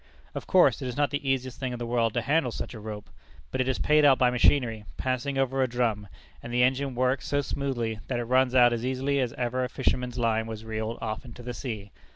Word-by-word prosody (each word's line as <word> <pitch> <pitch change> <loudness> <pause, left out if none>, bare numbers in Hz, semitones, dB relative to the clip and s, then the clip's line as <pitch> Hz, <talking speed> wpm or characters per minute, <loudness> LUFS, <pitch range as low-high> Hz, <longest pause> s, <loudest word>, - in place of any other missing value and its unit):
Of - - -6
course - - +4
it 130 - -3
is 125 - -5
not 145 -1 +2
the 145 -1 -2
easiest 130 -1 -1
thing 130 -2 -3
in - - -4
the 120 - -4
world 115 -2 0
to 120 - 0
handle 140 0 +1
such - - -5
a 115 - -8
rope. 105 -1 -7 0.4
But - - 0
it 130 - -1
is 130 - 0
paid 150 0 +3
out 140 -3 +6
by 125 -1 +3
machinery, 120 -3 +2
passing 130 +2 -2
over 135 0 +1
a 130 - +3
drum; 115 -4 -1 0.3
and 120 - -8
the 125 +1 +3
engine 130 +1 +1
works 130 +2 0
so 145 0 +1
smoothly, 125 -5 -3
that 125 - -1
it 120 - -1
runs 130 +1 +2
out 120 -1 +6
as 115 0 -3
easily 130 +2 0
as 125 -3 0
ever 125 +1 -1
a 125 - -2
fisherman's 125 -1 -1
line 110 -2 +1
was 110 0 -7
reeled 110 +1 -3
off 110 -1 -3
into 120 -1 -11
the 125 0 -5
sea. 110 -4 -6
125 Hz, 245 wpm, -27 LUFS, 115-130 Hz, 0.4 s, out